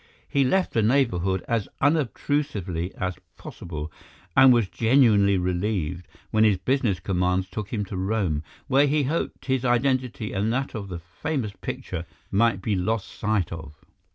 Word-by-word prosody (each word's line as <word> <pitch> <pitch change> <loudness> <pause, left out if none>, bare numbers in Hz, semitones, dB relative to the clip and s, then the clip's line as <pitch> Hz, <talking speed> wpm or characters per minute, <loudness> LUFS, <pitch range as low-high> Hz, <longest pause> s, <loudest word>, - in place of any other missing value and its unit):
He 140 - +2
left 185 +8 +1
the 115 - +3
neighbourhood 100 -7 +1
as 115 -4 0
unobtrusively 130 - 0
as 90 -2 -3 0.2
possible, 80 -2 -7 0.4
and 130 0 +8
was 120 -5 +4
genuinely 110 -4 +4
relieved 90 -1 -1 0.2
when 110 0 +4
his 105 -3 +4
business 120 -6 0
commands 90 0 0
took 95 +2 -6
him 105 -3 -1
to 95 - -7
Rome, 95 -5 0 0.2
where 140 +1 +4
he 145 +1 +2
hoped 155 +5 -2
his 130 -2 0
identity 125 -3 0
and 105 +3 0
that 135 +3 -1
of 105 -3 -5
the 90 -3 -5
famous 105 - -4
picture 85 +1 -5 0.2
might 105 -2 +2
be 105 - 0
lost 100 +3 -1
sight 105 -4 -1
of. 80 -2 -8
105 Hz, 155 wpm, -25 LUFS, 90-130 Hz, 0.4 s, and